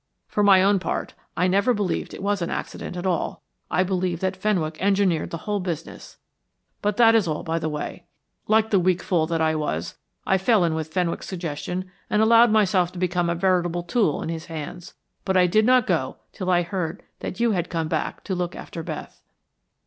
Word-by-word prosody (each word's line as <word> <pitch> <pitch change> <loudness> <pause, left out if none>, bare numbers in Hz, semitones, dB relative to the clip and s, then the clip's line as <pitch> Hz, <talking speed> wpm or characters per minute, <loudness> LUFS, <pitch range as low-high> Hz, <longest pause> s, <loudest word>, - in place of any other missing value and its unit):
For 210 - -1
my 195 -2 +6
own 200 0 +4
part, - - -3 0.2
I 180 - +3
never 200 +6 +3
believed 205 -3 -2
it - - -8
was 200 -1 0
an 170 - -1
accident 180 - -5
at 175 - -4
all. 180 -4 -1 0.3
I 185 - +2
believed 180 -2 -1
that 190 0 0
Fenwick 180 -6 -1
engineered 195 -4 +2
the 165 - -4
whole 210 -1 0
business. 170 -4 -6 0.6
But 205 0 0
that 230 -2 +6
is 220 -5 +3
all 155 -1 -2
by 165 +1 -1
the 160 - -2
way. 150 -1 -5 0.4
Like 220 0 +3
the 200 - +5
weak 180 0 +1
fool 165 -4 +1
that 165 -1 -1
I 160 0 +2
was, 150 - -3 0.3
I 190 - +2
fell 205 0 +3
in 165 - 0
with 160 -1 -3
Fenwick's 175 -1 -1
suggestion 180 +1 -4 0.2
and 210 - +2
allowed 230 +2 +6
myself 190 -5 +3
to - - -9
become 175 -1 0
a 170 - 0
veritable 175 -1 +1
tool 175 -3 +1
in - - -4
his 165 -1 -4
hands, 160 +2 -7 0.3
but 190 0 +1
I 180 - +6
did 215 +5 +3
not 255 -2 +5
go 160 -8 -1 0.2
till 185 -3 -4
I 175 -1 +3
heard 170 -2 -4 0.2
that 185 - -6
you 235 -1 +3
had 180 -4 -1
come 165 -2 -2
back - - -1
again - - -26
to 195 - -3
look 175 -1 -2
after 165 - -7
Beth." - - -7
180 Hz, 210 wpm, -24 LUFS, 165-200 Hz, 0.6 s, my